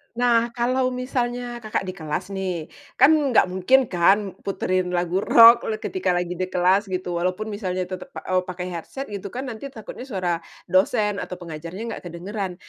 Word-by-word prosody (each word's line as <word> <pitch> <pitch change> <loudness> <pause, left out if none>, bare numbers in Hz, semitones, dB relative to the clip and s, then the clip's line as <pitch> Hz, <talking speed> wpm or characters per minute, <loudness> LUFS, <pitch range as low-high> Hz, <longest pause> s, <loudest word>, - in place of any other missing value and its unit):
Nah 235 -1 +2
kalau 255 +2 +1
misalnya 245 -1 -2
Kakak 215 -3 -2
di 185 - -4
kelas 180 +2 -5
nih, 185 -4 -3 0.3
kan 290 - +6 0.2
nggak - - +6
mungkin 245 +7 +3
kan 195 +3 +3
puterin 185 -2 -1
lagu 175 +1 0
rock 230 +2 +7
le 220 - 0
ketika 370 - -1
lagi 175 0 -2
di 185 - 0
kelas 185 +3 +2
gitu, 180 -2 -3
walaupun 185 +5 -1
misalnya 185 -3 -2
tetep 185 +7 -7
pa - - -7
eee, 185 0 +1
pakai 180 0 -5
headset 215 +11 -6
gitu 200 -1 -5
kan, 255 +2 -4
nanti 230 +4 -6
takutnya 245 0 -9
suara 180 -6 -1 0.3
dosen 205 +2 +2
atau 180 - -5
pengajarnya 170 +4 -7
nggak - - -6
kedengeran. 185 +2 -5
190 Hz, 175 wpm, -23 LUFS, 180-235 Hz, 0.3 s, rock